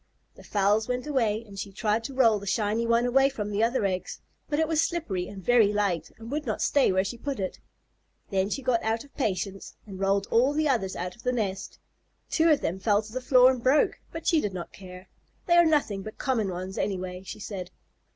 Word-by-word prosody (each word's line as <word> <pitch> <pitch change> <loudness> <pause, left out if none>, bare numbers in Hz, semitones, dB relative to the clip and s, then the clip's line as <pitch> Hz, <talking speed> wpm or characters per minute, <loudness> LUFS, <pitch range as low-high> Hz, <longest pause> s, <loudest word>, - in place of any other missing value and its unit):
The - - -16
fowls 210 +2 +1
went 250 +1 -2
away, 235 -7 0
and 200 -2 -10
she 200 - -5
tried 215 +2 0
to 275 - -5
roll 230 -5 +4
the 200 - -9
shiny 215 +3 0
one 235 +1 +3
away 270 +2 +4
from 210 -6 -5
the 205 +1 0
other 230 -2 +1
eggs, 185 -2 -3 0.3
but 295 - 0
it 320 0 +2
was 320 -1 +2
slippery 215 - -2
and 195 -2 -9
very 230 -4 +5
light 195 -6 -1
and 230 +2 -10
would 300 +1 -3
not - - -1
stay 285 -7 +3
where 190 0 +2
she 215 +4 -5
put 275 -1 -4
it. 190 -1 -4 0.7
Then 190 0 +1
she 275 +5 -3
got 245 -3 +2
out 225 +1 -1
of 285 - -19
patience 195 - -3
and 195 -3 -9
rolled 195 0 +1
all 255 +5 +4
the 310 +1 +1
others 225 -9 0
out 180 +1 -4
of 235 - -16
the 250 - 0
nest. 205 -5 -3 0.5
Two 330 0 +3
of 300 -2 +4
them 180 +3 -2
fell 205 +1 +2
to 220 +1 -12
the 255 - -3
floor 255 0 +6
and 255 -2 -4
broke, 265 +5 +3
but 330 - -7
she 320 -3 +3
did 195 -2 -3
not 175 -2 -7
care. 185 -1 -11 0.4
"They 345 - +2
are 345 - +7
nothing 280 -11 +1
but 215 +2 -9
common 230 -7 0
ones, 185 +1 -5
anyway," 185 -2 -3
she 195 - -8
said. 190 -3 -6
215 Hz, 230 wpm, -27 LUFS, 195-255 Hz, 0.7 s, are